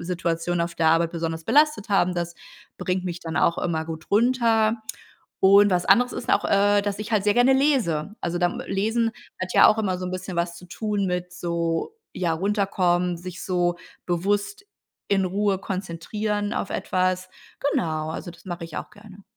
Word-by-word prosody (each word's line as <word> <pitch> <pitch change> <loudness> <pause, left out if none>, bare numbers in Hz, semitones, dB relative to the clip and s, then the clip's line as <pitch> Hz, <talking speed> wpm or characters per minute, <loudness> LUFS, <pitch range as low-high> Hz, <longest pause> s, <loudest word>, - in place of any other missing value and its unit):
Situationen 170 -1 -1
auf 170 0 -4
der 160 -1 +2
Arbeit 165 +1 +3
besonders 165 -1 -3
belastet 295 - +3
haben. 185 -3 +2
Das 170 -1 -3 0.4
bringt 185 0 -1
mich 175 -1 -4
dann 160 -2 -5
auch 170 - +2
immer 160 -2 -1
gut 160 -1 -8
runter. 230 0 +3 0.6
Und 200 +1 +6
was 180 -1 +1
anderes 245 +6 +4
ist - - -4
auch, - - +2
äh, 205 +1 +3
dass 200 -1 -3
ich 210 - -6
halt 205 -2 +2
sehr 205 -1 +3
gerne 245 +3 +5
lese. 235 - +1
Also, 175 +1 -2
dann 175 0 0
Lesen 220 +4 +1 0.3
hat 185 0 -3
ja - - +8
auch 215 - +4
immer 190 -4 0
so 185 - -4
'n - - -4
bisschen 185 0 -5
was 170 0 -1
zu 180 - -12
tun 205 +1 -2
mit 180 0 -3
so, 170 - -2 0.2
ja, 175 -3 0
runterkommen, 180 -2 +1
sich 180 0 -8
so 175 -2 +1 0.3
bewusst 205 - -1 0.4
in 195 -1 +2
Ruhe 195 +1 0
konzentrieren 205 +3 -3
auf - - -3
etwas. 185 0 -1 0.4
Genau, 155 -2 -1
also, 175 +2 -6
das 170 0 -17
mache 175 -2 -6
ich 165 - -9
auch - - -5
gerne. 205 -2 -15
185 Hz, 185 wpm, -24 LUFS, 170-205 Hz, 0.6 s, ja